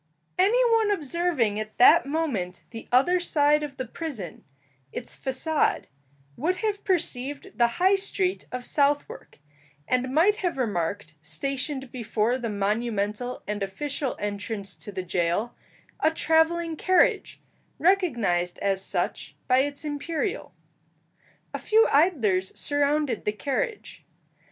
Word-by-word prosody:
Any 475 +7 +4
one 450 -2 +3
observing 305 - 0
at 215 0 -6
that 320 +6 +7
moment 265 - -2
the 225 -1 -9
other 315 +9 +4
side 300 -3 +3
of 290 -3 -6
the 260 - -3
prison 230 - -7 0.5
its 240 - -5
façade 280 +4 0 0.5
would 345 +7 0
have 410 -1 -1
perceived 310 -1 -2
the 235 - +6
high 380 +2 +4
street 385 -1 -2
of 250 0 -5
Southwark, 290 0 0 0.5
and 255 0 0
might 355 +9 +4
have 355 -8 -2
remarked, 200 -7 -2
stationed 265 - -3
before 235 0 -1
the 235 -2 -3
monumental 210 +3 -2
and 205 0 -3
official 270 +7 -3
entrance 205 0 -4
to 205 - -8
the 190 -2 -4
jail, 175 +6 -1 0.5
a 315 - +4
travelling 320 +1 +2
carriage, 370 +3 +2 0.4
recognized 240 - +1
as 195 -1 -1
such - - -2
by 255 0 +4
its 285 +2 -2
imperial. 305 +5 -3 1.0
A - - -3
few 445 +1 +4
idlers 235 - +2
surrounded 290 -4 0
the 210 - 0
carriage. 415 - -3
275 Hz, 125 wpm, -26 LUFS, 215-330 Hz, 1.0 s, that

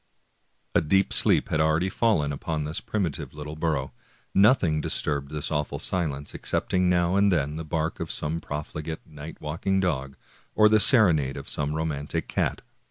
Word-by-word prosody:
" - - -44 0.3
A - - +4
deep 95 +5 +2
sleep - - +3
had 80 - +1
already 80 +3 +2
fallen 90 -12 +1
upon 75 +2 -3
this 75 +2 -3
primitive 100 -11 -3
little 75 0 -7
burgh; 75 -5 -1 0.4
nothing 95 - +4
disturbed 70 -2 -1
this 75 +1 -3
awful 75 -1 -1
silence 75 -6 -3
excepting 90 -1 0
now 90 0 +2
and 100 0 +4
then 75 -4 0
the 80 - -4
bark 80 0 -2
of - - -4
some 80 +2 -3
profligate, 75 +2 -6
night 75 0 -10
walking 85 +6 -1
dog, 70 -7 -1 0.4
or 105 - +6
the 110 0 +4
serenade 85 - +4
of - - -8
some 75 +1 -2
rom.antic 75 -2 -3
cat. - - -1
80 Hz, 165 wpm, -26 LUFS, 75-90 Hz, 0.4 s, or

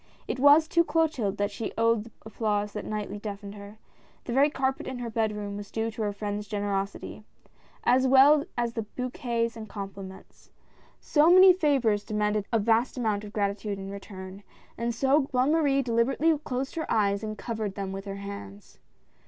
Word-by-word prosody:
It 255 - -3
was 290 +3 +6
to 340 - +4
Clotilde 305 -10 0
that 205 0 0
she 215 +2 -5
owed 230 -1 +2
the 230 - -13
applause 210 -2 -1
that 210 - -5
nightly 210 -1 -4
deafened 205 -1 -7
her 205 +1 -11 0.2
— - - -32
the 240 - -3
very 275 +3 +4
carpet 265 -2 -2
in 260 - -4
her 240 -2 -5
bed 220 -1 0
room 205 -1 -5
was 205 -1 -8
due 225 0 -2
to 220 - -7
her 210 -1 0
friend's 205 0 -4
generosity 200 0 -3 0.3
— - - -32
as 260 +1 +3
well 280 +3 +6
as 240 -1 -1
the 225 - -2
bouquets 240 -2 -2
and 220 -2 -8
compliments. 195 -2 -9 0.5
So 305 +1 +3
many 370 +1 +9
favors 270 - +1
demanded 210 -1 -1
a 230 - +3
vast 230 +4 +1
amount 215 -4 -1
of 210 - -9
gratitude 200 0 -2
in 195 0 -7
return, 195 -1 -9 0.3
and 235 +1 -2
so 270 +3 +2
Bonne 255 +2 +2
Marie 285 -4 +2
deliberately 255 +7 +2
closed 265 -2 -4
her 320 - -3
eyes 200 -2 +2
and 215 -1 -5
covered 215 -4 -4
them 195 -1 -4
with 195 +1 -6
her 195 -1 -5
hands. 105 - -9
220 Hz, 185 wpm, -27 LUFS, 205-260 Hz, 0.5 s, many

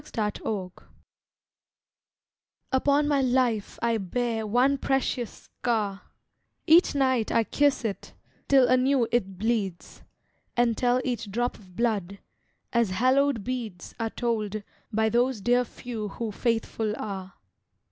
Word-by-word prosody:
THE - - -17 0.2
SCAR 195 -4 -4 2.0
Upon 285 +2 +3
my 285 -2 +2
life 245 -5 +1
I 230 -1 +2
bear 225 +3 -2
one 255 +6 +3
precious 260 -3 0 0.3
scar: 210 -5 0 0.6
Each 330 -1 +5
night 260 -5 +2
I 230 - +3
kiss 285 +1 +1
it, 205 -3 -5 0.3
till 270 -3 +6
anew 255 -1 +3
it 195 -6 0
bleeds, 205 -4 -2 0.6
And 240 -1 +3
tell 245 +1 +2
each 235 -4 -2
drop 240 +5 -1
of 185 -4 -18
blood, 200 -4 -1 0.6
as 235 -3 +3
hallowed 255 +3 +2
beads 230 -7 -5
Are 225 -1 -1
told 215 -3 -2 0.3
by 220 0 +2
those 245 +1 +1
dear 245 +5 +3
few 230 -2 -6
who 220 +2 -4
faithful 225 -1 -1
are. 195 -2 -6
235 Hz, 125 wpm, -27 LUFS, 210-255 Hz, 2.0 s, till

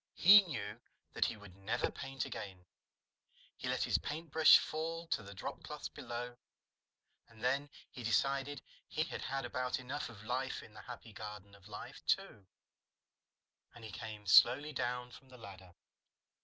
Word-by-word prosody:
He 200 +4 +10
knew 115 - -5 0.3
that - - +2
he - - -2
would 100 -3 -13
never 100 +3 -1
paint 135 -2 -4
again. 95 -3 -7 0.9
He - - -6
let - - +1
his - - +2
paintbrush 160 0 +5
fall 165 +2 -3
to - - +1
the 100 0 -10
dropcloths - - -6
below. 120 +1 -5 0.9
And 115 -1 -15
then 140 +3 +1 0.2
he 125 - -8
decided 135 +4 +1 0.2
he 155 - 0
had 170 - -5
had 135 -1 -2
about 125 0 -1
enough 130 +3 -4
of 105 -3 -12
life 130 +3 -2
in 110 - -14
the - - -10
Happy 120 -2 -10
Garden 105 -1 -8
of 100 0 -16
Life, 105 0 -9
too, 95 - 0 1.3
and 120 - -12
he 110 - -7
came 105 -1 -7
slowly 135 +10 +6
down 125 -1 -2
from 135 - -14
the 125 - -13
ladder. 95 -5 -12
120 Hz, 155 wpm, -35 LUFS, 105-135 Hz, 1.3 s, He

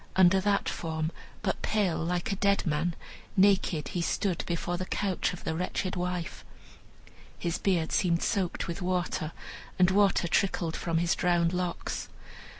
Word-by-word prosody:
Under 190 0 +6
that 200 0 +1
form, 160 -1 -2 0.3
but 190 - -1
pale 200 -6 +1
like 175 +4 -1
a - - 0
dead 200 0 +2
man, 165 +2 0 0.4
naked, 185 -5 +3
he 175 - -2
stood 180 +1 0
before 175 0 -1
the 185 +1 -4
couch 195 -3 0
of 180 - -8
the - - -1
wretched 180 +2 -2
wife. 180 -1 -3 0.9
His 170 -1 -2
beard 175 -5 +1
seemed 170 -4 +2
soaked 190 -5 -1
with 170 +3 -4
water, 180 -3 -1 0.5
and 185 0 +5
water 195 -2 +3
trickled 170 -2 +1
from 165 -1 -1
his 170 0 +2
drowned 175 -1 +2
locks. 180 -1 -3
180 Hz, 150 wpm, -29 LUFS, 170-190 Hz, 0.9 s, Under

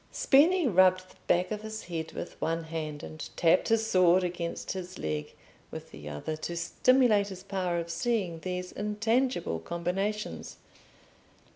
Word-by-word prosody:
Spini 325 +4 +4
rubbed 185 -2 +4
the - - -20
back 180 +3 +2
of 210 -1 -3
his 220 0 -6
head 165 -2 -5
with - - -7
one 165 0 -1
hand, 155 -2 -5
and 155 - -7
tapped 170 +1 +4
his 225 0 +2
sword 185 -3 +4
against 175 -1 -3
his 185 -1 -6
leg 75 -1 -4 0.3
with - - -9
the 75 0 -9
other, 75 - -4
to 170 +2 -5
stimulate 235 +1 +3
his 190 -2 -8
power 185 -3 -1
of 170 0 -3
seeing 180 -2 -1
these 180 +1 -4
intangible 210 - 0
combinations. 190 - -3
180 Hz, 150 wpm, -29 LUFS, 165-210 Hz, 0.3 s, Spini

